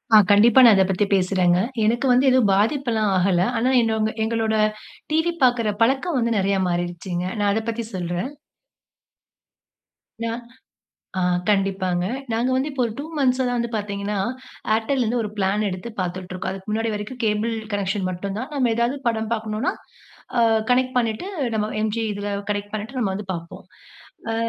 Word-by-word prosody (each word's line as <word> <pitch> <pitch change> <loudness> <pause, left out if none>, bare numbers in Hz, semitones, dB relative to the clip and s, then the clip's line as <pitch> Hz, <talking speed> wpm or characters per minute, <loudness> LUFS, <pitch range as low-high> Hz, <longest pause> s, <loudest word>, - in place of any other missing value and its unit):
ஆ, - - +11
கண்டிப்பா 220 +5 +6
நான் 225 -3 +8
அத 190 - +5
பத்தி 195 +2 +1
பேசுறேங்க. 185 -2 +3 0.3
எனக்கு 240 +5 +1
வந்து 255 +2 +4
எதுவும் 255 -5 +4
பாதிப்புல்லாம் 225 0 +1
ஆகல. 180 -1 +2 0.2
ஆனா, 240 +3 +2
என்னோ 225 -1 +1 0.3
எங்களோட 220 -1 0 0.6
டிவி 320 +2 +2
பார்க்கிற 235 -4 +3
பழக்கம் 270 +6 +1
வந்து 235 -1 +1
நெறைய 195 0 +1
மாறிடுச்சுங்க. 175 +1 -3
நான் 205 -1 +1
அத 220 - 0
பத்தி 230 +1 -3
சொல்றேன். 175 +6 -3 1.9
நான் 230 +1 -3 0.8
ஆ - - 0 0.3
கண்டிப்பாங்க. 190 -3 +1 0.3
நாங்க 235 +3 +1
வந்து, 265 +3 0
இப்போ 275 -2 -2
ஒரு 230 - -3
2 - - -3
மன்த்ஸ்சா 260 -1 +2
தான் 245 0 0
வந்து 235 0 -1
பார்த்தீங்கன்னா, 205 -1 -3 0.6
Airtelல 235 +4 +1
இருந்து 235 +2 0
1 210 - -3
பிளான் 200 +2 +1
எடுத்து 185 +5 -6
பார்த்துட்டுருக்கோம். 185 0 -4
அதுக்கு 190 +2 -8
முன்னாடி 225 +1 0
வரைக்கும் 210 +5 -5
கேபிள் 215 +2 0 0.2
கனெக்ஷன் 195 -1 -1
மட்டுந்தான். 200 +9 -5
நம்ம 255 -4 +2
எதாவது 235 +4 0
படம் 220 -1 -1
பார்க்ணும்ன்னா, 220 +2 -2 0.7
அ - - +5 0.3
கனெக்ட் 255 0 +2
பண்ணீட்டு, 230 - -1 0.3
நம்ம 215 0 -1
எம் 215 -1 0
ஜி 230 - 0
இதில 205 0 -4 0.2
கனெக்ட் 205 0 -4
பண்ணீட்டு 220 +5 -4
நம்ம 195 -5 0
வந்து 205 0 -6
பார்ப்போம். 170 -1 -8 0.7
அ. - - -1
215 Hz, 160 wpm, -22 LUFS, 195-235 Hz, 1.9 s, ஆ